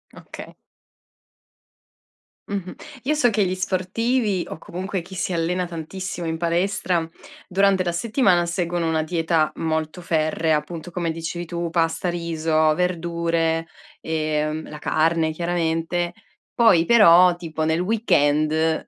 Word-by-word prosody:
Okay. - - -11 1.9
Mh-mh. 195 -3 -5 0.3
Io 300 +4 +1
so 295 -5 +3
che 215 -3 +1
gli 185 - -1
sportivi, 190 +3 0
o - - -6
comunque 185 +3 -5
chi 185 +3 -11
si 190 0 -2
allena 175 +2 0
tantissimo 175 +1 -5
in 160 - -2
palestra, 175 0 0 0.4
durante 195 0 +2
la 175 - -1
settimana 185 -2 +2
seguono 170 -1 -1
una 160 -1 +1
dieta 160 -1 0
molto 160 +1 -2
ferrea, 160 -1 +1
appunto 165 +3 -7
come 170 -1 -2
dicevi 165 +2 -5
tu, 170 0 -4
pasta, 165 +1 0
riso, 160 -2 +1
verdure, 170 -1 0 0.3
ehm, 155 0 -2
la 150 - -8
carne 160 +1 +1
chiaramente. 170 +1 -1 0.4
Poi 190 -8 +5
però 180 -5 +7
tipo 160 -2 -4
nel 160 +1 +1
weekend 160 -6 +1
170 Hz, 125 wpm, -22 LUFS, 160-185 Hz, 1.9 s, però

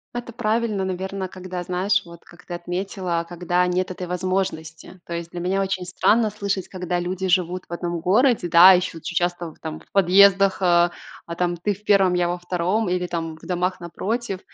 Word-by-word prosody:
Это 240 -1 -5
правильно, 220 -3 0
наверно, 190 0 -4
когда 185 -1 -6
знаешь, 185 +3 +1
вот 170 -1 -14
как 175 +1 -18
ты 175 - -7
отметила, 175 0 -3
когда 175 +1 0
нет 180 +1 -1
этой 180 0 -6
возможности. 180 -2 -3
То 170 - -7
есть 170 0 -5
для 175 - -6
меня 185 +3 0
очень 190 -1 -2
странно 215 +5 +2
слышать, 200 -2 -3
когда 180 -1 -3
люди 185 +2 -3
живут 180 0 +1
в - - -17
одном 170 -1 -3
городе, 215 +1 +2
да, 175 +3 +9
еще 180 -1 0
очень 170 +2 -7
часто 175 -2 -1
там 160 -1 -6
в - - -22
подъездах 195 +1 +5
э, 175 -1 +4 0.4
а, 170 - -6
там 175 -1 0
ты 190 +5 -1
в 205 +2 -16
1, 195 -3 +4
я 175 -1 +1
во 175 +1 -2
2 180 +4 -1
или 180 0 -1
там 165 -2 -4
в - - -21
домах 180 +1 -1
напротив. 195 +4 -3
180 Hz, 195 wpm, -23 LUFS, 175-195 Hz, 0.4 s, да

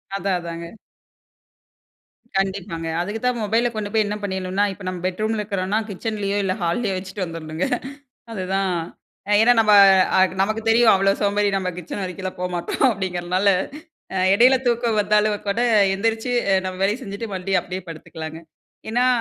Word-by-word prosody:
அதான் 195 -2 0
அதாங்க. 170 -1 -6 1.7
கண்டிப்பாங்க. 190 -4 -3
அதுக்கு 205 +5 -3
தான் 250 -1 +1
மொபைல 225 +3 +1
கொண்டு 210 -1 -4
போயி 220 -1 +3
என்ன 205 +1 -3
பண்ணிரணும்னனா, 190 0 -1
இப்போ 195 0 -11
நம்ம 185 -1 -4
பெட்ரூம்ல 215 +4 -1
இருக்குறோம்னா, 200 0 -1
கிச்சன்லயோ, 205 0 -3
இல்லை 185 -1 0
ஹால்லயோ 195 +4 0
வச்சுட்டு 190 0 -5
வந்துரணுங்க. 165 0 -4 0.7
அதுதான் 190 -2 -1 0.6
அ - - +3
ஏன்னா 235 +2 +6
நம்ப 210 -1 +4 0.4
அ - - +4
கு - - -10
நமக்கு 215 +3 0
தெரியும், 225 0 +6
அவ்வளோ 195 +1 +3
சோம்பேறி 205 0 +2
நம்ம 185 -1 -1
கிச்சன் 180 +3 -6
வரைக்கும்லாம் 185 0 -5
போமாட்டோம் 180 +7 0
அப்டீங்குறனால, 185 0 -1 0.7
அ - - -2 0.2
எடையில 250 +5 +6
தூக்கம் 235 -2 +1
வந்தாலும் 210 0 +2
கூட, 210 +4 0 0.3
எந்திரிச்சு 225 +4 -1 0.2
அ - - +4
நம்ம 185 0 -5
வேலைய 205 +5 +1
செஞ்சுட்டு 200 +1 -6
மறுப்டியும் 185 -1 0
அப்டீயே 185 +1 -6
படுத்துக்கலாங்க. 160 0 -8 0.5
ஏன்னா? 245 +3 +2
195 Hz, 150 wpm, -22 LUFS, 185-215 Hz, 1.7 s, ஏன்னா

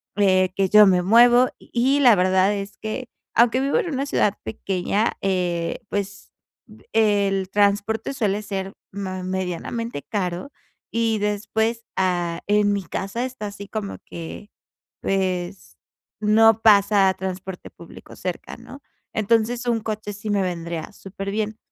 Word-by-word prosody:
eh, 185 -2 +3
que 195 -1 +1
yo 210 +1 +8
me 180 -1 +4
muevo, 240 +5 +6
y 265 +4 +1
la 245 -6 +7
verdad 185 +2 +3
es 200 0 -6
que, 220 +4 -5 0.3
aunque 240 +2 +4
vivo 275 +1 +1
en 345 - -2
una 275 +2 -1
ciudad 210 -7 +1
pequeña, 200 +2 -1
eh, 180 -3 -1
pues, 200 -1 -4 0.3
ve - - -18
el 200 -3 +2
transporte 205 +4 +1
suele 210 -5 0
ser 195 -1 -4 0.2
ma 190 -2 -5
medianamente 190 +2 -3
caro, 180 - -3 0.4
y 225 -1 +1
después, 220 +3 -1
ah, 175 -2 0
en 205 0 +3
mi 200 - -2
casa 195 +7 -3
está, 255 -5 -6
así 200 0 -9
como 210 -2 -5
que, 170 +5 -8 0.5
pues, 185 - -2 0.4
no 225 +1 +5
pasa 200 -3 +5
transporte 190 0 -6
público 170 - -13
cerca, 180 -1 -6
¿no? 250 +4 -12 0.3
Entonces 230 +3 +1
un 235 -2 0
coche 215 -1 -4
sí 210 +1 -7
me 200 -1 +2
vendría 170 -2 -4
superbién. 205 +3 -4
205 Hz, 140 wpm, -23 LUFS, 190-225 Hz, 0.5 s, yo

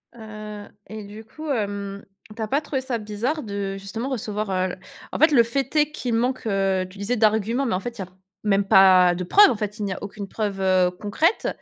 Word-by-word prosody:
Heu 215 -2 -9 0.2
et 215 -1 -8
du 210 +2 -10
coup, 310 +7 -9
hem, 200 -3 -3 0.3
tu 225 - -7
as 220 - -1
pas 280 +7 +1
trouvé 275 -3 -3
ça 255 -2 -2
bizarre 225 +8 -3
de, 200 -2 -4
justement, 220 +7 -5
recevoir, 215 -4 -3
heu 185 -1 -1 0.4
en - - -4
fait, 315 +1 +6
le 240 -5 +6
fait 270 +4 -3
est 300 0 +3
qu'il 245 -6 -3
manque, 250 +1 -1
heu, 195 -2 +1
tu 195 - -15
disais, 200 +5 -1
d'arguments, 220 +4 +2
mais 225 - 0
en 185 - -1
fait, 235 +3 -7
il 200 - -5
y - - -2
a - - -10 0.4
même 200 -1 +2
pas 185 -2 +7
de 180 - -3
preuves. 405 - +7
En - - -1
fait, 210 +1 -4
il - - -2
n'y 190 - -2
a - - -7
aucune 200 0 -7
preuve, 200 -2 -3
heu, 185 -1 +3
concrète, 215 - 0
210 Hz, 230 wpm, -23 LUFS, 195-240 Hz, 0.4 s, pas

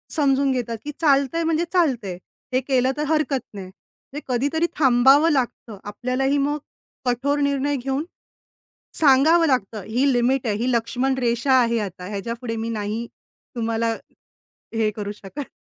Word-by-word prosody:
समजून 280 -3 +2
घेतात 240 -3 -2
की 295 - -5
चालतंय 280 +1 +2
म्हणजे 325 +1 +1
चालतंय. 250 - +1 0.4
हे 255 - +4
केलं 260 -1 +1
तर 300 - -1
हरकत 305 -3 +1
नाही. 195 -2 -7 0.5
म्हणजे 295 - -5
कधीतरी 290 +7 +1
थांबावं 270 +3 +5
लागतं, 245 -5 -2
आपल्यालाही 255 +7 -1
मग 285 +1 0 0.5
कठोर 265 +4 0
निर्णय 280 0 0
घेऊन 270 +2 -2 1.0
सांगावं 315 +4 +5
लागतं 225 -6 -1
ही 260 +5 +2
लिमिट 250 +1 +1
आहे. 210 -2 0
ही 240 +4 -1
लक्ष्मणरेषा 245 +1 0
आहे 235 -1 +1
आता 185 -3 -6
ह्याच्यापुढे 230 +3 -4
मी 225 +1 -3
नाही 220 +1 -3 0.5
तुम्हाला 230 0 0 0.8
हे 220 -1 +2
करू 205 -1 -4
शकत. 210 +7 -8
255 Hz, 140 wpm, -22 LUFS, 230-280 Hz, 1.0 s, थांबावं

